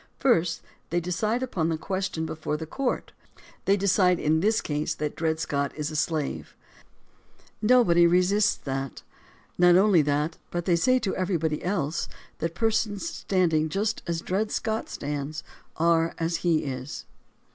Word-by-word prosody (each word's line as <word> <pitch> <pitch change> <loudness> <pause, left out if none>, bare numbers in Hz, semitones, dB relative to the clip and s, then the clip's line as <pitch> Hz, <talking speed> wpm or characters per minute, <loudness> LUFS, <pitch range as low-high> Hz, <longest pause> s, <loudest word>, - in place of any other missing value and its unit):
First, 180 - +2 0.3
they 175 - +1
decide 210 +8 -1
upon 170 -10 -1
the 160 - 0
question 185 -1 -3
before 155 -1 -3
the 160 - -5
court. 260 - -2 0.5
They 200 +1 +4
decide 185 -2 +3
in 155 +1 +2
this 215 +5 +2
case 150 0 -2
that 150 -1 -3
Dred 160 -1 -1
Scott 140 -2 -1
is 150 0 -3
a - - -6
slave. 155 -2 -2 1.1
Nobody 210 -8 +5
resists 185 +4 +3
that. 135 -1 -5 0.6
Not 175 0 +6
only 190 -3 +5
that, 150 +3 -1
but 175 -1 -3
they 175 - +3
say 255 +9 +3
to 205 -6 -2
everybody 165 -5 -1
else 170 -5 -1 0.3
that 165 0 -3
persons 225 - 0
standing 175 - +1
just 205 +6 -1
as 170 -1 -1
Dred 205 +5 -1
Scott 220 -1 -2
stands 145 +1 -4 0.3
are 165 0 +2
as 165 0 -1
he 165 -2 +1
is. 130 0 -5
170 Hz, 150 wpm, -26 LUFS, 155-200 Hz, 1.1 s, Not